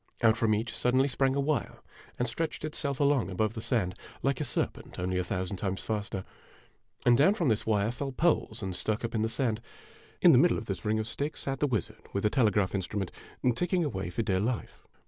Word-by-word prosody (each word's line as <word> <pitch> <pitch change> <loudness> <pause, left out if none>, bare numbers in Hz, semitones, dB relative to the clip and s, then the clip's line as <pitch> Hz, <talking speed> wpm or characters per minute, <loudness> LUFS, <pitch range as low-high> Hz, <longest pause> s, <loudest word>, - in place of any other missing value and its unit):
Out 110 -1 +6
from 110 -2 +2
each 115 +3 -2
sud 125 +1 +2
denly 135 +2 +4
sprang 135 0 +1
a - - +1
wire 140 -3 0 0.4
and 125 - 0
stretched 155 +5 -3
itself 140 -3 -2
along 140 -6 +3
above 105 +3 0
the 110 - -5
sand, 105 -7 0 0.3
like 140 +1 +1
a - - +2
serpent, 130 - -3
only 90 +1 -1
a - - 0
thousand 95 +2 -2
times 95 0 -2
faster; 100 -3 -3 0.8
and 120 -1 +7
down 155 - +5
from 170 -10 +1
this 110 -1 0
wire 105 0 +2
fell 135 +3 -4
poles 125 -6 +1
and 95 -2 -2
stuck 110 +4 -1
up 115 - -4
in 110 - +1
the 110 - +1
sand. 115 -2 0 0.6
In - - +7
the - - +7
middle - - +4
of - - -5
the - - -4
ring 110 +1 +1
of 110 - -1
sticks 145 +6 -2
sat 135 -1 -2
the 145 - +2
wizard, 115 -9 -2
with 100 +1 -1
a 105 - +3
telegraph 105 -7 +2
instrument, 95 0 -2 0.4
ticking 175 +7 +1
away 95 - -2
for 90 +6 -2
dear 95 -3 +1
life. 115 +3 -3
115 Hz, 225 wpm, -29 LUFS, 100-135 Hz, 0.8 s, and